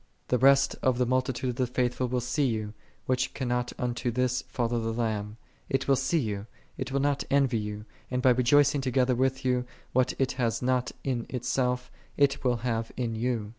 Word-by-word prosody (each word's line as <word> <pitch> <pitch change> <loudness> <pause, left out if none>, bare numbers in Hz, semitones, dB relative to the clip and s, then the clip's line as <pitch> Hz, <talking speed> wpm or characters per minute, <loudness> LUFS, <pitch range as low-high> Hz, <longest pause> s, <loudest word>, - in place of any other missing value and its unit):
The 125 - +2
rest 135 +2 +5
of 130 -2 +2
the 125 - +2
multi 130 +2 +1
tude 130 +1 -3
of - - -8
the 130 - +1
faithful 125 +1 0
will 125 0 -1
see 130 +4 +1
you, 110 -3 -2 0.3
which 130 0 0
cannot 125 -2 -1
unto 125 0 -1
this 125 +1 0
follow 120 -1 -1
the 115 0 -2
Lamb; 110 -2 -2 0.3
it 135 0 0
will 135 - +5
see 135 +6 +1
you, 105 -7 -2 0.3
it 130 -1 -4
will 140 - +1
not 140 0 +1
envy 135 -4 +3
you: 105 0 -5 0.2
and 125 - -1
by 125 0 +5
rejoicing 135 +3 +4
together 130 -1 +2
with 130 +2 0
you, 125 -1 +2 0.3
what 130 0 +2
it 135 -1 +1
hath 120 -2 -1
not 125 0 +1
in 125 -4 -2
itself, 125 0 -1 0.3
it 140 -1 +2
will 125 -2 +2
have 115 -2 -1
in 120 -3 -1
you. 115 -2 -1
125 Hz, 200 wpm, -28 LUFS, 120-130 Hz, 0.3 s, rest